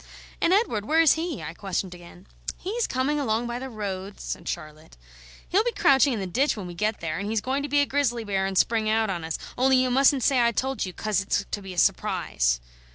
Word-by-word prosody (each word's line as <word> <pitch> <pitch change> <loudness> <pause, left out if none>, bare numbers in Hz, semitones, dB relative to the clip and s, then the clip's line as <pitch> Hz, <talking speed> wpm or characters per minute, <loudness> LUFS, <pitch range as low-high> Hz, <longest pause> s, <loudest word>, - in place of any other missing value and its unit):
"And 335 - +3
Edward, 370 - +2
where 315 +7 +2
is 325 -4 +6
he?" 325 -3 -3
I 160 - -6
questioned 190 -1 -3
again. 175 +1 -14 0.3
"He's 445 +6 -2
coming 270 +4 0
along 230 -3 0
by 240 0 -3
the 265 +1 -6
road," 200 -3 -5
said - - -5
Charlotte. 155 - -7 0.5
"He'll 395 +5 +3
be 480 - 0
crouching 280 -8 +4
in 225 - -2
the 195 - -3
ditch 250 +9 +1
when 200 - -5
we 175 - -7
get 210 +4 -1
there, 160 0 -3
and 200 +2 -3
he's 220 0 +1
going 260 +5 -1
to 290 - -4
be 290 +1 +3
a - - +3
grizzly 260 -5 0
bear 195 -2 0
and 190 -1 -3
spring 220 0 +2
out 220 -1 +2
on 175 -3 -4
us, 160 0 -3 0.2
only 265 +1 +5
you 255 0 +2
mustn't 270 0 +4
say 260 -1 +3
I 235 0 +3
told 265 -2 -1
you, - - -5
'cos 210 +1 -1
it's 200 0 -1
to 205 - -3
be 195 -1 -8
a - - -14
surprise." - - +1
225 Hz, 240 wpm, -25 LUFS, 190-270 Hz, 0.5 s, is